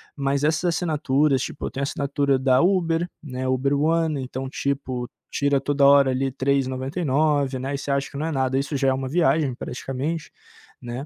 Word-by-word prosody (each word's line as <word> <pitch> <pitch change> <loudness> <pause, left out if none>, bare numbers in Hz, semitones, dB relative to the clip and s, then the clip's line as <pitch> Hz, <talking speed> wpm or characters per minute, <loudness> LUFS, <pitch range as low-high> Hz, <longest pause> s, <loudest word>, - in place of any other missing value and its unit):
mas 140 0 -1
essas 160 +3 +1
assinaturas, 150 -5 +1
tipo, - - -7
eu - - -3
tenho 140 - -3
assinatura 140 -1 0
da 130 -1 +3
Uber, 170 -1 +2
né, 130 -3 -5
Uber 135 +2 +1
One, 160 -1 +1
então, 130 +1 -5
tipo, 130 -3 -3 0.2
tira 140 -1 +1
toda 145 0 +2
hora 140 -1 +6
ali 130 +1 0
3,99, 135 +1 0
né, 135 +2 -3
e - - -2
você 140 +1 -4
acha 140 0 0
que - - -8
não 150 - -2
é 165 - -2
nada, 130 -2 0
isso 140 +2 -2
já 135 -1 +1
é 130 - +4
uma 130 0 -3
viagem 155 -2 +2
praticamente, 135 +6 -4 0.5
né? 120 +3 -6
140 Hz, 185 wpm, -23 LUFS, 130-150 Hz, 0.5 s, hora